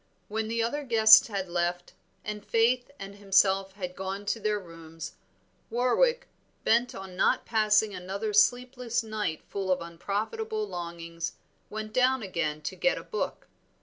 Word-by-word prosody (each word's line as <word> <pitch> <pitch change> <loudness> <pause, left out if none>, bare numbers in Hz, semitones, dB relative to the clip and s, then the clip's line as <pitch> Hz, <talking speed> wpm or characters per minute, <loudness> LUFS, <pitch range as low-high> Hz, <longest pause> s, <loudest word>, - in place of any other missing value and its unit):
When 220 +1 -2
the 230 +1 0
other 290 +6 -1
guests 220 -4 +7
had 200 -4 -3
left, 175 0 -2 0.3
and 210 -1 -5
Faith 240 +4 +2
and 200 -2 -9
himself 195 -1 +3
had 180 -2 -6
gone 195 +1 -5
to 220 +3 -1
their 210 0 0
rooms, 165 -3 -10 0.6
Warwick, 360 - +2 0.4
bent 240 +2 +2
on 190 -1 -8
not - - +2
passing 215 -1 +3
another 195 +4 -4
sleepless 245 +2 +2
night 215 -8 -3
full 195 -2 -3
of 185 - +2
unprofitable 220 - -3
longings, 170 - -5 0.4
went 215 0 -6
down 255 0 +3
again 155 -5 -2
to - - -4
get - - +1
a - - -6
book. 435 - -4
210 Hz, 150 wpm, -28 LUFS, 185-230 Hz, 0.6 s, guests